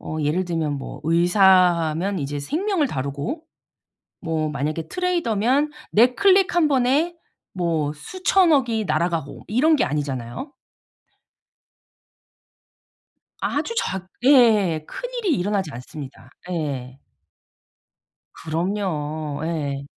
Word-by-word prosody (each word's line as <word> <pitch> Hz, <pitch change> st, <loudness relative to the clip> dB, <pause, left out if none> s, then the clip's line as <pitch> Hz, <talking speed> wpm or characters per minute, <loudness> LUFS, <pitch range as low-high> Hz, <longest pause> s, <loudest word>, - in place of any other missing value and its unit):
어 155 Hz, -, -6 dB
예를 155 Hz, +6 st, 0 dB
들면 165 Hz, -4 st, -2 dB
뭐 135 Hz, -, -7 dB
의사하면 175 Hz, +1 st, +3 dB
이제 145 Hz, +1 st, -3 dB
생명을 325 Hz, -, 0 dB
다루고 140 Hz, -, -4 dB, 0.8 s
뭐 160 Hz, -2 st, -1 dB
만약에 150 Hz, +3 st, -3 dB
트레이더면 295 Hz, -, +1 dB, 0.2 s
내 240 Hz, +4 st, +5 dB
클릭 385 Hz, -2 st, +4 dB
1 320 Hz, -3 st, +4 dB
번에 280 Hz, +6 st, +2 dB, 0.4 s
뭐 165 Hz, -5 st, -1 dB
수천억이 290 Hz, -, +2 dB
날아가고 160 Hz, -2 st, -2 dB
이런 300 Hz, +9 st, +3 dB
게 -, -, +2 dB
아니잖아요. 135 Hz, -, -4 dB, 2.9 s
아주 465 Hz, -, -1 dB
작 190 Hz, -, -2 dB, 0.2 s
예예예예. 215 Hz, -, +4 dB
큰일이 -, -, -4 dB
일어나지 190 Hz, -3 st, -1 dB
않습니다. 130 Hz, +2 st, -10 dB, 0.2 s
예. 135 Hz, -6 st, -4 dB, 1.4 s
그럼요. 155 Hz, -4 st, -3 dB
예. 145 Hz, -4 st, -3 dB
175 Hz, 215 characters per minute, -22 LUFS, -, 2.9 s, 내